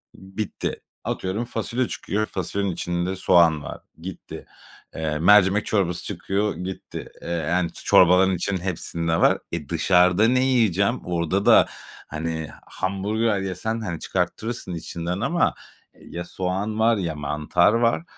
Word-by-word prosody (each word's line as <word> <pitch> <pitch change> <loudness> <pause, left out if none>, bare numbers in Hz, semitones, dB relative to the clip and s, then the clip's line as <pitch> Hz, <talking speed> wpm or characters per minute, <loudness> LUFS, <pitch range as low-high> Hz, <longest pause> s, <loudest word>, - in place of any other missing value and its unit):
bitti. 95 +2 -5 0.3
Atıyorum 100 +6 -2
fasulye 120 +2 -2
çıkıyor, 105 +2 -2
fasulyenin 100 +1 -2
içinde 90 +2 -2
soğan 85 -5 +4
var, - - -8 0.2
gitti. 95 0 -8 0.5
Eee, 75 -1 -2
mercimek 100 +3 +5
çorbası 90 -5 0
çıkıyor, 100 +1 -2
gitti. 90 +2 -7
Eee, - - -7
yani, 85 +1 0
çorbaların 90 +1 +4
içinde 90 +1 -2
hepsinde 85 -2 -1
var. - - +5
Eee, 80 -4 -5
dışarıda 90 +4 +4
ne 130 +1 +3
yiyeceğim? 115 -2 +2
Orada 90 +3 -1
da, - - +7 0.4
hani, 80 0 -4 0.2
hamburger 100 +3 -1
yesen, 95 +4 -3
hani, 85 -6 -4
çıkarttırırsın 110 -4 -3
içinden 85 +3 -4
ama - - +1 0.5
ya 85 0 -7
soğan 95 +5 -3
var, 115 0 +4
ya 85 -5 -2
mantar 75 +7 +1
var. 115 +6 +2
95 Hz, 130 wpm, -23 LUFS, 85-105 Hz, 0.5 s, da